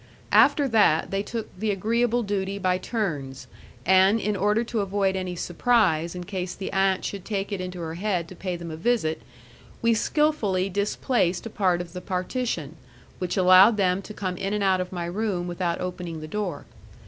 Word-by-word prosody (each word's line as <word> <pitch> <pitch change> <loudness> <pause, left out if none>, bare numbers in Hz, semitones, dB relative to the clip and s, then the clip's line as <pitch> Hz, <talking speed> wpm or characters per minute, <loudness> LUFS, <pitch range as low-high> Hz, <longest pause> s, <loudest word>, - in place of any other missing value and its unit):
After 285 -2 +5
that 210 -9 +3
they 195 0 0
took 225 +1 -6
the 210 +4 -2
agreeable 235 +4 +1
duty 200 -1 -2
by 185 -2 +1
turns, 150 - -3 0.4
and 190 +4 +5
in 210 0 -1
order 210 +4 +2
to 235 -1 -3
avoid 195 -1 0
any 185 -1 -3
surprise 175 -3 +1
in 180 - -5
case 180 -1 -4
the 195 - -6
aunt 195 -1 +2
should 200 -2 -4
take 200 -1 -3
it 200 -2 -2
into 180 -1 -6
her 160 -1 -4
head 180 -2 -1
to 185 - -10
pay 185 0 -4
them 170 -1 -7
a - - -5
visit, 165 - 0 0.6
we 230 0 +4
skilfully 220 -8 +1
displaced 200 -1 0
a 230 - -6
part 180 -4 +1
of 175 -1 -9
the 180 - -6
partition, 180 - -3 0.4
which 180 +2 -2
allowed 185 +4 +7
them 185 -1 +2
to 205 - -10
come 185 -2 -3
in 195 +3 -2
and 210 -1 0
out 190 -1 +3
of 180 - -5
my 175 -2 -3
room 180 -1 -2
without 175 -1 -2
opening 180 -3 -5
the 155 - -7
door. 180 -4 -4
190 Hz, 190 wpm, -25 LUFS, 180-210 Hz, 0.6 s, allowed